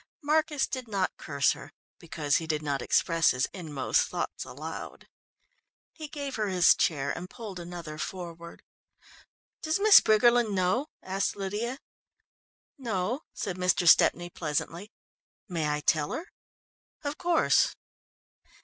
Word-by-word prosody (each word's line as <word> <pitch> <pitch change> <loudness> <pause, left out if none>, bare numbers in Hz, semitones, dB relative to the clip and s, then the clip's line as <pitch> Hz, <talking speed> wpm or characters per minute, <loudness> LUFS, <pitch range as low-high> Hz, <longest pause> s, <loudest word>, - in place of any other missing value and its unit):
Marcus 305 -1 +2
did 255 -2 -5
not 195 -3 -1
curse 140 -2 +1
her 140 - -8 0.3
because 155 -4 0
he 165 - -5
did 155 -1 -1
not 140 -2 -1
express 165 -1 +2
his 125 0 +1
inmost 155 -8 0
thoughts - - -4
aloud. - - -8 0.9
He 310 -2 -8
gave 285 -3 -5
her 215 -1 0
his 180 -2 +5
chair 145 -5 0
and 180 +1 -7
pulled 210 -6 -8
another 170 -3 -8
forward. 170 +1 -7 1.0
"Does 315 +3 0
Miss 425 0 +9
Briggerland 235 0 +4
know?" 185 +10 +1 0.2
asked 190 +1 -1
Lydia. 210 +6 -3 1.0
"No," 225 +1 -2
said 185 -2 -4
Mr. 180 -1 +1
Stepney 175 +1 +5
pleasantly. 170 +6 -3 0.6
"May 165 -5 -1
I 150 0 -1
tell 150 0 +1
her?" 350 +5 -6 0.7
"Of 290 +1 -4
course." 345 -2 +3
185 Hz, 130 wpm, -28 LUFS, 165-240 Hz, 1.0 s, Miss